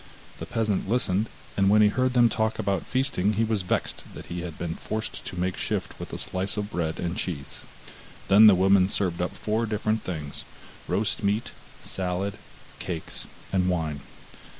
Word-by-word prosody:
The - - -5
peasant 110 -4 0
listened, 110 -3 +1 0.3
and 100 -1 +4
when 105 +1 +6
he 105 - +6
heard 130 +3 +1
them 120 -1 +7
talk 110 0 0
about 100 -1 -1
feasting 120 -6 +1
he 110 +2 +2
was 110 -2 +1
vexed 90 - -1
that - - -8
he 90 - -3
had 85 -3 -6
been 85 -2 -3
forced 110 +5 -4
to 90 - -5
make 90 +1 0
shift - - -2
with - - -6
a - - -4
slice 95 +3 -1
of 105 0 -2
bread 80 -2 -2
and 85 0 -2
cheese. 75 -7 -4 0.7
Then 105 +3 +9
the 105 - +8
woman 95 0 +5
served 90 -4 0
up 90 - +1
four 110 +2 0
different 110 0 0
things, 75 -5 -5 0.4
roast 100 +6 0
meat, 105 +2 0 0.3
salad, 95 +2 -2 0.4
cakes, 85 -3 -4 0.3
and 95 -1 +3
wine. 80 -5 -1
100 Hz, 175 wpm, -27 LUFS, 90-110 Hz, 0.7 s, Then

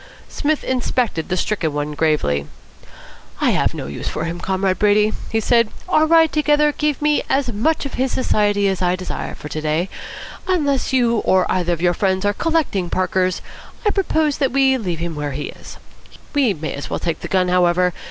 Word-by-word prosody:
Psmith 305 0 -1
inspected 245 -8 -1
the 185 - 0
stricken 170 -5 -1
one 150 0 -2
gravely. 145 - 0 0.9
"I - - +3
have - - +1
no - - -5
use 70 +1 -6
for - - -3
him, 170 +1 -4
Comrade 190 0 0
Brady," 210 +1 +3 0.2
he 225 - +1
said. 230 0 +3 0.2
"Our 315 -3 +3
ride 325 -1 +5
together 300 0 +3
gave 300 0 -1
me 300 0 +3
as 270 -3 +1
much 290 +10 0
of 275 - -5
his 260 0 0
society 205 -5 +1
as 190 -2 -1
I 180 0 +2
desire 185 0 -5
for - - -9
to 155 - -4
day. 155 +4 0 0.6
Unless 290 -9 +1
you 240 -3 +2
or 185 -1 +3
either 175 -1 +1
of 170 0 -4
your 175 0 +4
friends 190 +1 0
are 205 - +2
collecting 290 - 0
Parkers, 185 0 0 0.4
I 420 - +4
propose 315 -7 0
that 270 -3 +1
we 270 0 +3
leave 185 -9 -3
him 170 0 -4
where 145 -2 -4
he 145 +2 -4
is. - - -11 0.6
We 265 -9 +2
may 155 0 -4
as 140 - -6
well - - -2
take 165 -2 -2
the - - -6
gun, 185 -1 +1
however. 180 0 +3
200 Hz, 195 wpm, -20 LUFS, 175-270 Hz, 0.9 s, ride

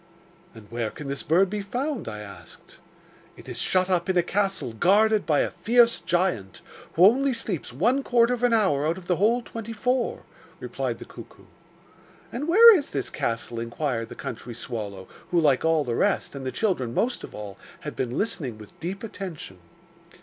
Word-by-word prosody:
'"And 110 -2 -12
where 115 -2 -2
can 140 +5 -8
this 140 - -2
bird 180 +5 +3
be 210 -1 -2
found?" 250 +7 -3
I 105 0 -6
asked. 100 -5 -13 0.6
'"It - - -14
is - - -5
shut 185 0 +2
up 180 -1 0
in 185 - +2
a 175 - +4
castle 195 - -1
guarded 210 - +3
by 150 -2 +3
a - - -1
fierce 235 0 +3
giant, 175 - -1 0.3
who 175 - +6
only 265 +6 +4
sleeps 215 - -3
one 235 - +2
quarter 240 -2 +3
of 245 - -4
an 245 -1 +3
hour 190 -11 +2
out 165 +3 0
of 185 - -10
the 180 -1 +1
whole 230 +5 +2
twenty 230 0 -7
four," 250 +3 -1 0.4
replied - - -3
the - - -10
cuckoo. - - -13 0.9
'And 275 +6 -4
where 450 +6 +9
is 295 -6 -1
this 135 - -3
castle?' 115 0 -3
inquired 115 -1 -3
the - - -9
country 120 0 -7
swallow, 105 -5 -6 0.2
who, 175 - +2
like 145 -5 +3
all 160 -2 +3
the 120 -3 -3
rest, - - 0
and 135 -2 -6
the - - -2
children 130 - -1
most 245 +2 0
of - - -9
all, 105 -2 -8 0.2
had - - -6
been 125 -1 -3
listening 145 - -2
with 105 -1 -14
deep 190 +5 -5
attention. 180 - -7
175 Hz, 190 wpm, -25 LUFS, -, 0.9 s, where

